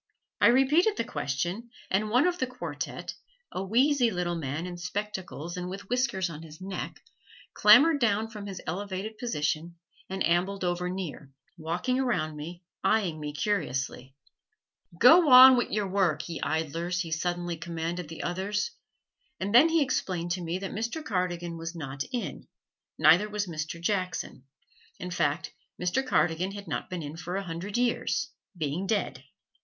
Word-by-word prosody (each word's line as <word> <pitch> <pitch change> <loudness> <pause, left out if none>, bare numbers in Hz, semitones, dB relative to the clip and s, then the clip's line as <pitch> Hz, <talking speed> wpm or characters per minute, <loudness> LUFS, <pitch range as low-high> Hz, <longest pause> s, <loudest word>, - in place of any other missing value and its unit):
I - - +8
repeated 295 - +4
the - - +1
question 175 - -3 0.2
and 210 +3 +1
one 250 +6 +4
of 360 0 0
the 260 - 0
quartette, 255 0 -5 0.4
a 185 - -3
wheezy 250 +5 +3
little 180 -3 -1
old 165 - -3
man 145 +4 -3
in 180 -1 -6
spectacles 180 -2 -5
and 180 0 -4
with 195 +1 -8
whiskers 250 -7 +1
on 160 -2 -8
his 160 -1 -12
neck, 190 0 -6 0.5
clambered 315 0 +7
down 220 -2 +2
from 210 -2 -8
his 190 -2 -7
elevated 200 +4 -4
position 165 -6 -2 0.3
and 190 0 -1
ambled 185 +3 +1
over 180 0 -1
near, 175 -7 -6 0.2
walking 175 +10 -1
around 200 -12 0
me, 170 +4 -8 0.2
eying 190 -8 +1
me 150 -1 -4
curiously. 135 -7 -2 0.8
"Go 250 - +8
wan 260 -5 +9
wi' 245 - +1
yer 210 0 0
wurruk, 185 -6 +1
ye 165 -2 -5
idlers!" 165 +3 -1
he 165 -3 -5
suddenly 175 +1 -1
commanded 165 +1 -4
the 165 - -6
others. 195 - -1 0.7
And 195 +2 -2
then 275 +8 +8
he 325 -2 +4
explained 180 -9 -2
to 180 +1 -1
me 170 +1 -2
that 195 0 -5
Mr. 235 +9 -3
Cardigan 175 -3 -2
was 165 +1 -5
not 135 -4 -4
in, 245 -3 -4 0.5
neither 205 +6 +5
was 210 0 -2
Mr. 160 -1 -5
Jackson. 180 -7 -2 0.5
In 180 - -6
fact, 145 -4 -1 0.3
Mr. 180 +9 0
Cardigan 185 -6 +1
had 200 -1 -8
not 150 - -3
been 180 -3 -4
in 150 +2 -7
for 175 +2 -5
a 195 - -1
hundred 180 +5 -4
years 245 +3 0 0.3
being 160 +4 -2
dead. 215 -1 -1
185 Hz, 160 wpm, -28 LUFS, 165-215 Hz, 0.8 s, wan